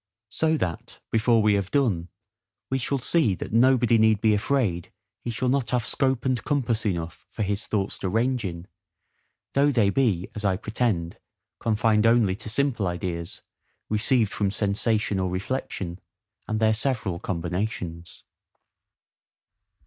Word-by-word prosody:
So 160 +9 +1
that, 85 - -4
before 115 0 +3
we 105 -1 +4
have 100 -2 0
done, 100 -12 +1 0.6
we 135 - +1
shall 140 +2 0
see 130 - +2
that - - -7
nobody 120 -1 +4
need 110 -1 +4
be 110 0 +3
afraid 105 -6 0 0.3
he - - -6
shall 120 +2 -1
not 130 -3 +1
have 125 -2 0
scope 130 -2 0
and 130 -2 0
compass 115 -7 0
enough 85 -2 -4
for 110 - -3
his 100 +1 -2
thoughts 100 -2 -1
to 95 - -2
range 120 +4 +1
in, 85 -3 -5 0.9
though 140 +1 +4
they 115 -8 +3
be, 100 -8 +1
as 105 - -5
I 95 -2 +2
pretend, 105 -6 -1 0.4
confined 110 0 +2
only 115 -5 +4
to 110 0 -6
simple 120 -4 0
ideas, 85 -2 -4 0.5
received 110 0 +2
from 100 -2 0
sensation 105 0 0
or 95 -1 0
reflection, 90 -2 -4 0.5
and 110 0 -1
their 110 -1 +4
several 110 -6 -1
combinations. 90 -1 -4
110 Hz, 145 wpm, -25 LUFS, 95-120 Hz, 0.9 s, we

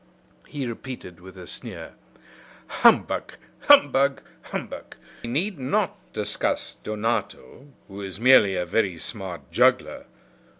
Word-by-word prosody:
He 140 -2 -5
repeated 120 -7 -8
with 95 +1 -13
a 90 - -9
sneer: - - -8 0.7
"Humbug! - - +2 0.3
humbug! 140 0 +5 0.2
humbug! - - -7 0.3
We 120 - -5
need 170 - -1
not 130 - 0 0.2
discuss - - -2
Donato, 110 - -3 0.2
who 100 0 -9
is 95 0 -6
merely 115 -6 +6
a 90 -1 -1
very 95 -1 0
smart 95 -1 -7
juggler. - - +2
110 Hz, 115 wpm, -24 LUFS, 95-130 Hz, 0.7 s, merely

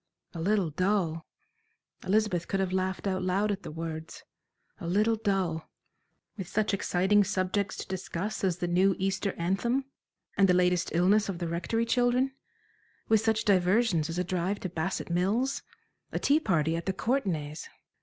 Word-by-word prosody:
A 165 - -5
little 195 -2 +1
dull! 180 -1 0 0.8
Elizabeth 200 -4 +1
could 195 - -1
have 190 -1 -1
laughed 190 +1 -1
out 190 -1 0
loud 195 +3 +1
at 200 -1 -3
the - - -7
words. 160 0 -6 0.6
A 170 - -6
little 210 +6 +2
dull 190 -7 -1 0.7
with 190 -4 -5
such 215 +2 0
exciting 195 +1 +3
subjects 190 0 -1
to - - -6
discuss 190 +2 -4
as 180 -3 +1
the 175 - -2
new 185 +2 +3
Easter 195 +1 -1
anthem, 235 +10 0 0.5
and 195 -1 +4
the 180 - +5
latest 180 0 +2
illness 200 +5 +3
of 190 - -3
the 170 -1 -3
Rectory 180 +8 -1
children; 245 +3 +2 0.8
with 220 -1 +5
such 220 -1 +1
diversions 190 -3 +3
as 165 - -4
a 180 - +1
drive 185 +3 -1
to 185 - -3
Bassett 175 +1 -3
Mills, 210 +10 +1 0.5
a - - -2
tea 290 +2 +3
party 165 - +1
at 170 +2 -5
the 190 - +1
Courtenays! 175 - -2
190 Hz, 165 wpm, -29 LUFS, 175-210 Hz, 0.8 s, the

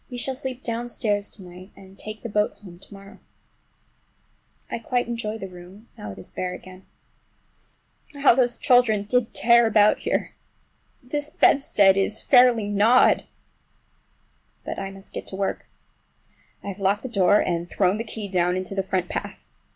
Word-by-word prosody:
We 250 - -7
shall 265 +2 -3
sleep 260 -1 -6
downstairs 230 -3 -2
to 195 - -12
night, 180 +1 -12
and 190 0 -15
take 215 +1 -9
the - - -4
boat 210 0 0
home 180 -4 -14
to - - -17
morrow. 195 +1 -13 1.5
I - - -5
quite 245 +2 -1
enjoy 230 -2 -4
the 195 - -7
room, 185 +4 -14
now 105 - -8
it - - -11
is 95 - -12
bare 180 0 -4
again. 185 +1 -14 1.3
How 280 -2 +5
those 245 -1 +1
children 240 -5 +3
did 240 +2 -1
tear 235 0 +5
about 210 -1 +4
here! - - -2 0.7
This 290 +4 -3
bedstead 200 -11 +4
is 210 +3 0
fairly 245 -5 +4
gnawed! 210 +5 +4 1.4
But - - -5
I 195 - -4
must 195 0 -13
get - - -7
to - - -7
work. 195 0 -3 1.0
I - - -5
have 195 0 -7
locked 200 +2 0
the - - -4
door 205 -3 +3
and 170 0 -2
thrown 190 0 +1
the 225 - -3
key 220 -2 -7
down 180 -1 0
into 185 +1 -5
the 195 - 0
front 185 -1 -2
path. - - -6
205 Hz, 165 wpm, -24 LUFS, 190-235 Hz, 1.5 s, How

